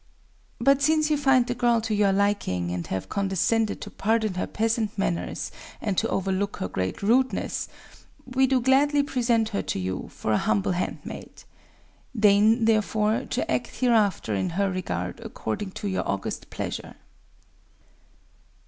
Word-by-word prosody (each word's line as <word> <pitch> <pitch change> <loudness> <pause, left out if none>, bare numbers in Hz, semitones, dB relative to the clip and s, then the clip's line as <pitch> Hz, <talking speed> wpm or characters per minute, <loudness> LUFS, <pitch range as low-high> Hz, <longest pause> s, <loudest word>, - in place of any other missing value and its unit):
But, 275 +3 +4
since 310 +1 +3
you - - +4
find 265 -3 +4
the 245 - -2
girl 240 -1 +2
to 220 0 -2
your 205 -1 +3
liking, 195 - 0
and 90 -1 -4
have 95 0 -3
condescended 200 - 0
to - - -7
pardon 220 -1 0
her 180 - -2
peasant 220 -1 -1
manners 175 -3 -2 0.3
and 205 -3 -2
to - - 0
overlook 195 +1 -1
her - - -2
great 95 - -3
rudeness, 255 +5 +1 0.6
we 260 +1 +2
do 260 0 +3
gladly 280 +3 +3
present 235 -5 +1
her 200 - -1
to - - -3
you, 95 0 -3
for 110 - -3
an - - +3
humble 105 - +1
handmaid. 180 0 -5 0.8
Deign, 215 +3 +5
therefore, 220 +2 +1
to 255 - -1
act 125 -1 -2
hereafter 215 - +2
in 95 -2 0
her 200 -1 +2
regard 90 - -3
according 190 - -4
to 205 - -5
your 190 - -2
august 100 0 -3
pleasure." - - -5
210 Hz, 150 wpm, -25 LUFS, 185-240 Hz, 0.8 s, Deign